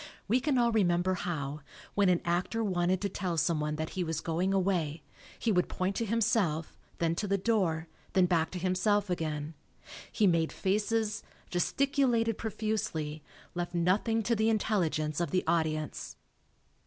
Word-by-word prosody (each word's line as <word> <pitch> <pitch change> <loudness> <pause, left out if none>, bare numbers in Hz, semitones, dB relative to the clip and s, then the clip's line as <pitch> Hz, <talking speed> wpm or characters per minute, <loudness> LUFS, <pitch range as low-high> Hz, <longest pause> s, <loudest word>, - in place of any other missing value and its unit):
We 235 +5 +3
can 270 0 +1
all 235 -1 +3
re 220 -2 +3
member 175 +1 +2
how, 155 -6 -3 0.3
when 200 -2 +3
an 180 -1 +3
actor 180 +6 0
wanted 180 -2 +1
to 200 - +1
tell 180 -2 -2
someone 150 -1 +1
that 155 +1 -4
he 185 - -2
was 160 -2 -2
going 175 +4 0
away, 175 -6 0 0.3
he 230 - 0
would 180 -3 +2
point 185 +2 -1
to 230 - 0
himself, 200 -8 +1 0.2
then 165 -1 +1
to 205 +5 -2
the 200 0 +2
door, 185 -6 +1 0.3
then 185 -1 +5
back 170 -2 +2
to - - -3
himself 185 +2 +1
again. 155 -2 -2 0.6
He 215 - +2
made 170 -3 +3
faces, 215 +2 0 0.3
gesticulated 235 - +1
profusely, 210 -9 -2 0.3
left 175 0 -3
nothing 205 +6 +2
to 235 +3 +1
the 220 +1 +2
intelligence 170 -8 0
of 170 - 0
the 185 -1 +1
audience. 155 -2 -1
185 Hz, 160 wpm, -30 LUFS, 165-215 Hz, 0.6 s, then